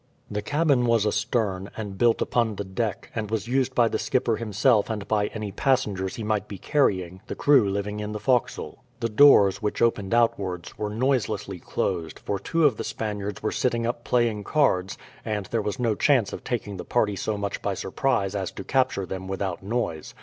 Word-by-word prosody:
The 105 0 -2
cabin 145 -3 +2
was 115 -3 +3
astern, 100 -3 0
and 105 -3 -5
built 115 +3 +3
upon 115 -3 0
the 100 - -3
deck, 100 +2 -3
and 110 -2 -3
was 110 0 -2
used 130 +1 0
by 120 -1 +5
the - - -1
skipper 120 -3 +1
himself 110 0 +2
and 105 -3 -4
by 105 -1 +1
any 105 -2 -5
passengers 100 -6 0
he 115 - -5
might 105 -1 -1
be 100 - -7
carrying, 95 - 0
the - - -4
crew 135 -8 +4
living 100 +1 -3
in 105 0 -4
the 105 - -4
forecastle. 125 -1 -1 0.2
The 115 - -1
doors, 105 -5 +6
which 105 -1 -2
opened 115 -2 +1
outwards, 95 -7 0
were 105 -1 -3
noiselessly 110 -5 -1
closed, 85 -3 -2
for 100 - -3
two 165 - +1
of 130 -7 +3
the - - -3
Spaniards 105 -2 -4
were 110 - 0
sitting 120 -2 0
up 120 0 -2
playing 120 -4 +1
cards, 95 -10 +1 0.3
and 105 -2 -2
there 115 - +1
was 105 0 -3
no 115 -3 +1
chance 125 -2 +2
of - - -7
taking 105 -5 -3
the - - -5
party 105 -4 +1
so 105 +2 -2
much 100 0 -3
by 100 -1 -1
surprise 100 0 0
as 95 -3 -2
to - - -7
capture 130 -5 +1
them 95 +1 -6
without 95 -2 -3
noise. 95 -7 -3
105 Hz, 200 wpm, -25 LUFS, 100-120 Hz, 0.3 s, doors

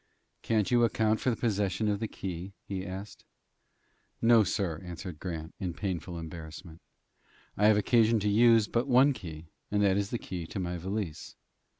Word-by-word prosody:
"Can't 110 -2 +1
you 120 -1 +5
account 110 -1 +2
for - - +1
the 120 - +1
possession 105 -2 0
of 100 -1 0
that 110 - -2
key?" 95 -1 -6
he 95 -2 -4
asked. 95 +3 -8 1.0
"No, 115 -1 +6
sir," 90 -4 -2
answered 90 -2 -7
Grant, 80 -3 -5
in 90 -4 -3
painful 90 -3 -4
embarrassment. 80 0 -9 0.7
"I 105 - +4
have 110 -1 +5
occasion 115 +1 +4
to 105 - 0
use 115 +1 +5
but 120 +4 0
one 135 +2 +5
key, 80 -8 -9 0.2
and 105 0 +1
that 95 -1 +3
is 100 0 -1
the 120 - -2
key 90 -6 -6
to 100 - -5
my 90 -1 -2
valise." 95 -2 -4
100 Hz, 175 wpm, -30 LUFS, 90-110 Hz, 1.0 s, No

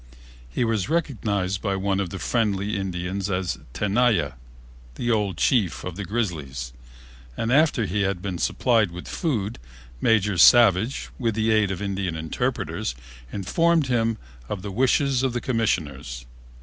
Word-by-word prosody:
He - - -1
was 110 -1 0
recognized 105 - -1
by 100 -3 -1
one 95 0 0
of 95 -3 -1
the 95 - -6
friendly 105 -1 0
Indians 95 0 -3
as 90 -6 -1
Tenaya, 105 - +1 0.6
the 120 -1 -1
old 105 -5 0
chief 105 -7 +1
of 90 -2 -5
the 100 - -4
Grizzlies, 75 - -3 0.6
and, 115 +2 0
after 145 -6 +3
he 100 +2 -1
had 95 -2 0
been 90 -2 -4
supplied 115 -6 +2
with 90 +1 -9
food, 115 - -2 0.4
Major 105 -4 +2
Savage, 115 +2 +5
with 115 -4 0
the 110 0 +1
aid 110 -2 +3
of 95 +1 -3
Indian 95 -4 -2
interpreters, 80 -5 -2 0.4
informed 165 - +2
him 115 -2 +1 0.3
of 95 -3 -4
the 100 - -5
wishes 130 +4 +2
of 130 -2 0
the 120 - -1
Commissioners. 75 - -2
100 Hz, 150 wpm, -24 LUFS, 90-115 Hz, 0.6 s, Savage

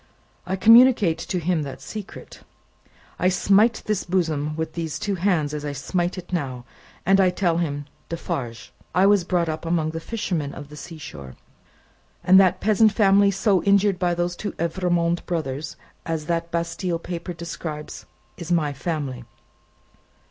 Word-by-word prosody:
"I 190 - 0
communicate 225 -5 +6
to 180 - -3
him 175 -1 0
that 135 -3 -6
secret. 215 -3 -9 0.8
I 180 - +3
smite 200 +5 +3
this 210 -3 -1
bosom 155 -5 -1
with 160 0 -3
these 165 -3 -3
two 205 -1 -2
hands 175 -6 0
as 150 -1 -4
I 145 -1 -3
smite 175 +6 -2
it 180 0 -9
now, 130 -7 -3 0.4
and 195 +1 +5
I 185 - +4
tell 180 -2 0
him, 145 -4 -2 0.2
'Defarge, 125 -8 -5 0.2
I 185 +1 +5
was 200 -2 +4
brought 175 -1 0
up 155 0 -4
among 165 -2 0
the 165 - -4
fishermen 165 -7 -3
of 145 - -9
the 150 - -11
sea 165 +2 -9
shore, 70 - -9 0.9
and 190 +1 +7
that 190 -2 +4
peasant 215 +1 +4
family 200 -1 +4
so 195 -1 +2
injured 200 -1 +3
by 175 -2 +1
the 175 0 0
two 190 +4 -5
Evrémonde 170 0 0
brothers, 155 -3 -3 0.3
as 160 -2 -3
that 170 0 -1
Bastille 170 +1 -2
paper 175 +1 -6
describes, 165 -2 -7 0.3
is 170 0 -6
my 155 -4 +1
family. 140 -4 -4
170 Hz, 160 wpm, -23 LUFS, 155-190 Hz, 0.9 s, and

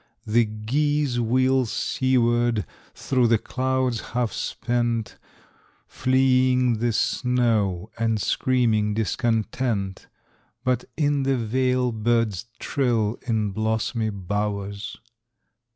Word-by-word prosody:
The 115 +2 +3
geese 130 +5 0
wheel 130 +2 +2
seaward 120 -4 +1 0.3
through 125 -3 +1
the 115 0 +4
clouds 130 0 -1 0.2
half 120 -3 0
spent, 120 -2 -2 0.7
Fleeing 130 -2 +2
the 120 +1 +1
snow 110 -5 0
and 115 -1 +1
screaming 110 -4 +1
discontent, 110 -2 -1 0.6
But 125 -1 0
in 145 -2 +1
the 135 -1 +1
vale 125 +2 +1
birds 115 -2 0
trill 120 -6 0
in 110 -3 0
blossomy 110 +2 -1
bowers. 100 +1 -3
120 Hz, 90 wpm, -24 LUFS, 110-130 Hz, 0.7 s, the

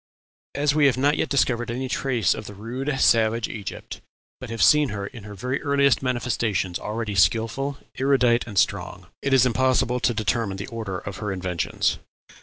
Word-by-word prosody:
"As 145 0 +2
we 150 -1 +4
have 130 - +1
not 145 +3 +3
yet 155 - -1
discovered 120 -4 +1
any 130 +3 -3
trace 125 -6 +1
of 110 - -8
the 105 - -9
rude, 130 +7 -4
savage 115 0 +3
Egypt, 105 -3 -7 0.4
but - - -8
have 115 -1 -1
seen 150 -2 +5
her 100 -1 -4
in 110 0 -10
her 105 -1 -9
very 125 +7 -3
earliest 140 -2 +2
manifestations 115 -7 -1
already 110 0 -4
skilful, 115 +8 +1 0.2
erudite, 125 -3 +3
and 105 -4 -7
strong, 90 -2 0 0.2
it 140 - -1
is 130 -2 +5
impossible 125 0 +1
to 120 - +1
determine 110 -2 -1
the 100 - -5
order 110 -6 -4
of 100 +1 -7
her 105 -1 -3
inventions. 90 -3 -1
120 Hz, 180 wpm, -24 LUFS, 105-130 Hz, 0.4 s, seen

